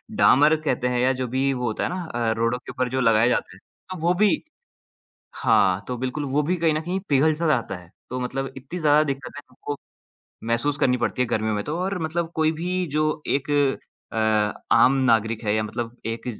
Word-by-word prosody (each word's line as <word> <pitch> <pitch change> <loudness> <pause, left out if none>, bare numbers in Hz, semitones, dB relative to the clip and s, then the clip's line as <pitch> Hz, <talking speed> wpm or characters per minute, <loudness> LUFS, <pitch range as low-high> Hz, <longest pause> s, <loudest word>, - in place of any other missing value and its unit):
डामर 150 +4 +5
कहते 125 -4 0
हैं 125 -1 0
या 130 +1 +3
जो 125 - -1
भी 135 +3 0
वो 125 -1 -3
होता 110 - -2
है - - 0
ना 180 0 -4
अ, 120 -6 -1
रोडों 115 +2 +1
के - - -10
ऊपर 130 -1 -2
जो 130 +1 -1
लगाया 115 -1 +4
जाता - - -1
हैं। - - -17 0.3
हाँ, 185 - -5
वो 175 +2 +3
भी 210 - +2 0.9
हाँ, 100 -6 +3
तो 125 - -3
बिल्कुल 130 +4 -3
वो 140 +2 +1
भी 180 +5 0
कहीं 165 -2 +2
न 155 - -1
कहीं 180 +4 -2
पिघल-सा 155 +4 +2
जाता 120 -9 0
है। 90 -1 -13 0.2
तो 130 +1 -3
मतलब 135 +2 -3
इतनी 140 +7 -7
ज़्यादा 150 -1 +4
दिक्कतें 140 0 -5
हमको 145 +3 -6 0.7
महसूस 120 +5 0
करनी 125 -1 +3
पड़ती 125 +1 -1
हैं 120 - -2
गर्मियों 110 0 0
में 105 - -1
तो 155 +3 -3
और 190 +1 -2
मतलब 165 +1 -2
कोई 160 0 +2
भी 180 +3 -2
जो 155 - +2 0.3
एक 140 +1 -2 0.6
अ, 110 -1 +1
आम 130 - +6 0.2
नागरिक 110 0 +1
है 105 0 +1
या 110 - +1
मतलब 115 +2 -5 0.2
एक 115 - -12
130 Hz, 210 wpm, -24 LUFS, 115-155 Hz, 0.9 s, आम